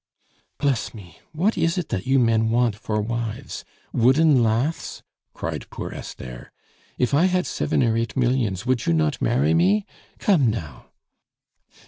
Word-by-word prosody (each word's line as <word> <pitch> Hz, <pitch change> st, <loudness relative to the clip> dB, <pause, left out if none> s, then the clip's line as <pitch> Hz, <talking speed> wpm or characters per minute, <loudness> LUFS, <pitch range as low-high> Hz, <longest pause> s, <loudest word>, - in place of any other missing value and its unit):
"Bless 135 Hz, -5 st, -1 dB
me! 90 Hz, -6 st, -13 dB
what 185 Hz, +8 st, +1 dB
is 165 Hz, +2 st, +1 dB
it 180 Hz, -, -2 dB
that 95 Hz, -, -3 dB
you 135 Hz, +1 st, +4 dB
men 115 Hz, -2 st, +3 dB
want 120 Hz, -2 st, +2 dB
for 105 Hz, 0 st, -2 dB
wives? 115 Hz, 0 st, -4 dB, 0.3 s
Wooden 130 Hz, +3 st, +4 dB
laths?" 120 Hz, +8 st, -1 dB, 0.3 s
cried -, -, -5 dB
poor -, -, -6 dB
Esther. 60 Hz, -2 st, -9 dB, 0.5 s
"If 125 Hz, +2 st, 0 dB
I 155 Hz, +6 st, +5 dB
had 185 Hz, -2 st, +1 dB
seven 125 Hz, -, 0 dB
or 115 Hz, -2 st, +2 dB
eight 115 Hz, +1 st, -2 dB
millions, 120 Hz, -6 st, 0 dB
would 125 Hz, -2 st, 0 dB
you -, -, +3 dB
not 80 Hz, -2 st, 0 dB
marry 75 Hz, +4 st, +2 dB
me 95 Hz, +5 st, +3 dB, 0.3 s
come 160 Hz, -, +3 dB
now?" 80 Hz, -, -6 dB
115 Hz, 150 wpm, -23 LUFS, 105-135 Hz, 0.5 s, I